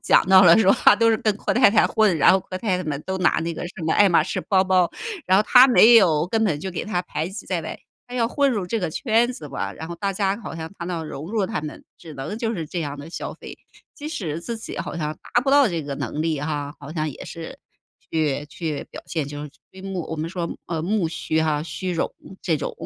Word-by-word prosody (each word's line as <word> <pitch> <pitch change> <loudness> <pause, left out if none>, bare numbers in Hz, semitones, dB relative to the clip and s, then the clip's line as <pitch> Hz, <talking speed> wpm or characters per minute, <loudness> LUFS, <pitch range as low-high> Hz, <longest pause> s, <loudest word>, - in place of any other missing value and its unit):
讲 - - +4
到 190 0 +8
了 170 -3 +8
说 200 -3 +5
啊， - - +8
都 230 +2 +3
是 225 - +3
跟 215 -2 0
阔 - - -1
太 250 +1 +6
太 210 +1 +4
混， 215 -6 +2
然 150 - +6
后 190 - +4
阔 185 0 -7
太 185 -1 0
太 180 - -5
们 150 -2 -4
都 190 0 -3
拿 185 - +2
那 165 +1 -2
个 165 - -6
什 175 - -10
么 160 - +1
爱 205 - +5
马 170 - +4
仕 - - -3
包 190 -2 +4
包， 185 -2 +3 0.4
然 185 - +4
后 205 - +5
她 250 +4 +7
没 240 -2 +7
有， 165 -8 +4
根 225 +2 +1
本 155 -8 0
就 190 - -4
给 175 - -4
她 180 -4 -2
排 165 -3 -4
挤 195 +2 -8
在 180 -3 -1
外。 - - -6 0.3
她 245 - -10
要 235 -2 +1
混 280 +2 +2
入 210 -7 -1
这 225 +6 -2
个 180 -5 -2
圈 235 - +2
子 155 -11 -9
吧， 135 - -4
然 160 - -8
后 170 - -5
大 200 +2 -2
家 195 0 0
好 - - -7
像 160 0 -6
她 170 - -5
要 170 -2 -4
融 150 0 -7
入 215 -3 +1
她 - - -3
们， 150 0 -8 0.2
只 160 -2 -11
能 140 +11 -5
就 230 -1 -2
是 165 -5 -4
这 165 +4 -5
样 145 -3 -4
地 145 +3 -10
消 - - -5
费。 - - -11 0.4
即 295 0 -6
使 170 - -4
自 230 +6 -5
己 220 - -8
好 - - -5
像 155 -2 -2 0.2
达 240 - +4
不 270 - 0
到 280 -1 +6
这 170 -4 -3
个 140 -1 -5
能 150 - -3
力 160 -3 -1
哈， 145 -1 -3
好 145 +1 -9
像 155 -2 -2
也 - - -10
是 165 -1 -8 0.5
去 150 -2 -1
去 155 0 -5
表 - - -10
现， 155 -4 -3
就 145 +1 -7
是 150 - -8 0.2
虚 190 - -12
慕 190 -3 -4
我 - - -3
们 160 +1 -4
说 175 -2 -3 0.2
呃， 165 -2 -3
慕 185 +1 0
虚 160 -1 -1
哈、 155 -2 0
虚 185 +2 -4
荣 170 - -1 0.3
这 165 -4 0
种。 - - -4
175 Hz, 290 characters per minute, -23 LUFS, 155-210 Hz, 0.5 s, 到